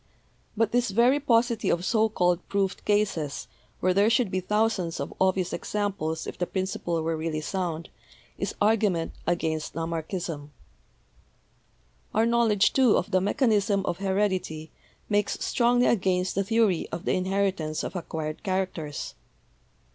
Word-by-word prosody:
But 225 Hz, -1 st, +2 dB
this 245 Hz, -1 st, +2 dB
very 240 Hz, +7 st, +4 dB
paucity 235 Hz, -4 st, +2 dB
of 175 Hz, +1 st, 0 dB
so 220 Hz, 0 st, +3 dB
called 180 Hz, -4 st, +2 dB
proved 195 Hz, -1 st, -1 dB
cases, 195 Hz, -9 st, 0 dB, 0.3 s
where 185 Hz, 0 st, +3 dB
there 200 Hz, +3 st, +4 dB
should 230 Hz, -3 st, +2 dB
be 185 Hz, -, 0 dB
thousands 200 Hz, -3 st, 0 dB
of -, -, -4 dB
obvious 185 Hz, -1 st, +2 dB
examples 190 Hz, -6 st, -2 dB
if -, -, -7 dB
the 180 Hz, -, 0 dB
principle 180 Hz, -3 st, -2 dB
were 165 Hz, 0 st, 0 dB
really 160 Hz, -1 st, -2 dB
sound, 170 Hz, -1 st, -3 dB, 0.5 s
is -, -, -3 dB
argument 205 Hz, -6 st, +2 dB, 0.2 s
against 160 Hz, -3 st, -1 dB
Lamarck 165 Hz, -1 st, -3 dB
ism. 165 Hz, -6 st, -4 dB, 1.6 s
"Our 220 Hz, -, +4 dB
knowledge, 225 Hz, -3 st, +3 dB
too, 260 Hz, -5 st, +5 dB
of -, -, -2 dB
the 185 Hz, -1 st, +3 dB
mechanism 205 Hz, -2 st, +2 dB
of 175 Hz, -, -2 dB
heredity 190 Hz, -5 st, -1 dB, 0.4 s
makes 205 Hz, -1 st, +1 dB
strongly 245 Hz, 0 st, +3 dB
against 185 Hz, -3 st, +1 dB
the 195 Hz, -, +1 dB
theory 215 Hz, -4 st, +2 dB
of 165 Hz, -, -5 dB
the -, -, +1 dB
inheritance 185 Hz, -4 st, 0 dB
of -, -, -5 dB
acquired 160 Hz, -3 st, -4 dB
characters. 185 Hz, -7 st, -3 dB
190 Hz, 140 wpm, -27 LUFS, 170-215 Hz, 1.6 s, too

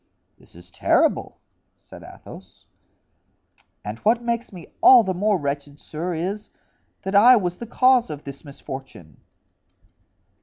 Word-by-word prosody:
"This -, -, -22 dB
is 90 Hz, +1 st, -16 dB
terrible," -, -, +1 dB, 0.4 s
said -, -, -15 dB
Athos. -, -, -14 dB, 1.2 s
"And 105 Hz, +2 st, -6 dB
what 230 Hz, +2 st, +1 dB
makes 235 Hz, 0 st, -3 dB
me 180 Hz, -4 st, -11 dB, 0.2 s
all 250 Hz, -3 st, +8 dB
the 190 Hz, -2 st, -2 dB
more 205 Hz, +2 st, +1 dB
wretched, 145 Hz, -1 st, -5 dB
sir, 170 Hz, +3 st, -5 dB
is, 190 Hz, +6 st, -4 dB, 0.5 s
that 195 Hz, 0 st, -4 dB
I 235 Hz, +6 st, +7 dB
was 180 Hz, -5 st, -2 dB
the 235 Hz, -, -7 dB
cause 255 Hz, -1 st, +3 dB
of 150 Hz, -1 st, -7 dB
this 140 Hz, 0 st, -10 dB
misfortune." 135 Hz, -, -10 dB
180 Hz, 130 wpm, -22 LUFS, 140-225 Hz, 1.2 s, all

